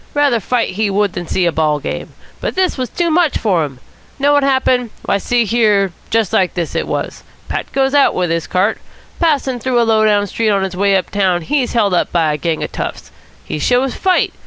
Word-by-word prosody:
Rather 285 -5 +3
fight 235 +4 0
he 210 +2 -1
would 200 -1 0
than 175 -1 -5
see 185 - 0
a 170 - +2
ball 155 -2 +1
game. 145 - -6 0.3
But - - -3
this 370 -1 +1
was 255 -2 -3
too 340 -2 -1
much 330 -2 +2
for 185 -7 +1
him. 135 -4 -7 0.4
Know 285 +1 +3
what 290 - +4
happened? 260 -3 +1 0.2
Why, 200 - +1
see 240 +3 +1
here, 210 -4 +2 0.2
just 225 -4 0
like 185 -2 +1
this 170 -3 -3
it - - -2
was. - - -4 0.3
Pat - - -4
goes 270 0 +1
out 285 -1 +4
with 180 -2 0
his 165 -1 -1
cart. 190 +4 0 0.4
Passing 280 -6 +1
through 245 +1 0
a - - +4
low 220 -1 +3
down 205 -1 +3
street 220 +3 -1
on 200 -2 +2
his 190 -1 -4
way 200 +1 +2
up 190 - -1
town 185 -4 +1
he's 260 - -1
held 210 -5 +2
up 175 - +1
by 160 -3 +1
a - - -2
bunch 165 -2 -1
of - - -5
toughs. - - -6 0.3
He 155 - -4
shows 250 - +1
fight. 370 -1 +1
215 Hz, 230 wpm, -16 LUFS, 185-260 Hz, 0.4 s, what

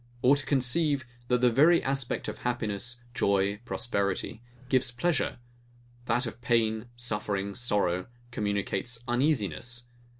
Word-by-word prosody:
Or 135 +3 +7
to 145 - -4
conceive, 140 +1 +1 0.2
that 125 0 +2
the 125 -1 +5
very 155 +8 +5
aspect 135 -2 0
of - - -5
happiness, 120 0 -2
joy, 100 -2 +1
prosperity, 100 -1 -1 0.3
gives 130 -1 +2
pleasure; 140 +5 0 0.7
that 120 +3 +2
of 115 0 -7
pain, 115 -1 +1
suffering, 105 -4 -2
sorrow, 100 -6 0 0.2
communicates 105 +2 -1
uneasiness? 120 - +1
120 Hz, 120 wpm, -29 LUFS, 105-130 Hz, 0.7 s, Or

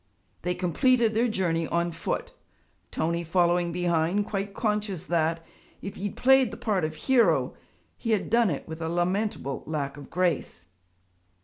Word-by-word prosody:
They 180 +1 -1
completed 225 +6 +2
their 230 +3 +2
journey 170 -6 0
on 170 0 0
foot; 165 0 -3 0.6
Tony 170 +2 -1
following 175 0 +2
behind, 175 +3 +1
quite 200 0 -4
conscious 210 -5 -1
that, 165 -1 0 0.3
if 195 - -7
he 200 - -5
had 205 - -4
played 265 -1 +5
the - - -8
part 200 -6 0
of 155 0 -2
hero, 255 - +3 0.5
he 230 - -4
had 215 -3 +1
done 230 -1 +3
it 145 - -4
with 160 0 -7
a 160 - -2
lamentable 175 -4 -1
lack 145 -3 -3
of 145 - -11
grace. 170 - -1
180 Hz, 155 wpm, -27 LUFS, 165-210 Hz, 0.6 s, played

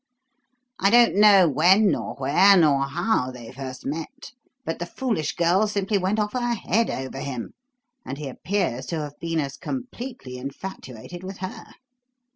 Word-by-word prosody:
I 195 - +4
don't 240 +2 +6
know 200 -3 +7
when 180 +8 +4
nor - - -3
where 175 +9 +5
nor 145 -5 +4
how 140 - 0
they 120 -3 -10
first 130 -1 -8
met; 165 - -6 0.3
but 165 - -3
the 175 - -4
foolish 215 - -2
girl 175 +5 +3
simply 200 0 0
went 190 +3 0
off 210 -1 -1
her 240 -1 0
head 225 +2 0
over 130 +1 -5
him, 125 -5 -5 0.5
and 135 - -6
he 150 -1 -6
appears 135 -3 -2
to 165 - -2
have 145 -1 -8
been 165 -1 -2
as 140 -2 -3
completely 250 - -6
infatuated 140 +1 -8
with 190 +1 -7
her. 185 0 -8
175 Hz, 160 wpm, -24 LUFS, 140-205 Hz, 0.5 s, know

